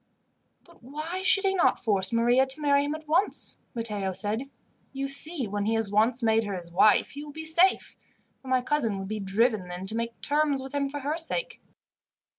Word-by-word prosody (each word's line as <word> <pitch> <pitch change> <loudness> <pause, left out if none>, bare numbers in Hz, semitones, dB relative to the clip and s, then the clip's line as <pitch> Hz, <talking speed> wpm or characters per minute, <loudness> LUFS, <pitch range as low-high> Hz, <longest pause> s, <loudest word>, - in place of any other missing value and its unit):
"But 340 -1 -22
why 305 +8 -6
should 390 +1 +4
he 385 -1 +1
not 370 - +2
force 200 -4 0
Maria 240 +3 +3
to 265 +3 +1
marry 285 -1 +2
him 290 +1 -3
at 310 -1 -11
once?" 335 +7 0 0.2
Matteo 210 -5 -1
said. 210 +8 -1 0.4
"You 275 0 -3
see, 280 -1 0
when 205 +1 -3
he 225 - +1
has 225 -3 -2
once 230 +4 +2
made 225 0 +2
her 200 -1 -4
his 170 -2 -7
wife 200 +4 +3
he 290 +1 -8
will 300 - -10
be 320 +2 -8
safe, 340 +4 +2 0.5
for 265 - -15
my 255 -1 +1
cousin 245 -8 0
would 195 0 -6
be 215 0 -4
driven 205 0 0
then 180 +1 -7
to 215 +3 +1
make 230 0 -4
terms 295 -1 +1
with 265 +1 -8
him 280 -1 -1
for 290 +1 -6
her 295 +4 -2
sake." 480 +9 -1
255 Hz, 210 wpm, -26 LUFS, 215-300 Hz, 0.5 s, should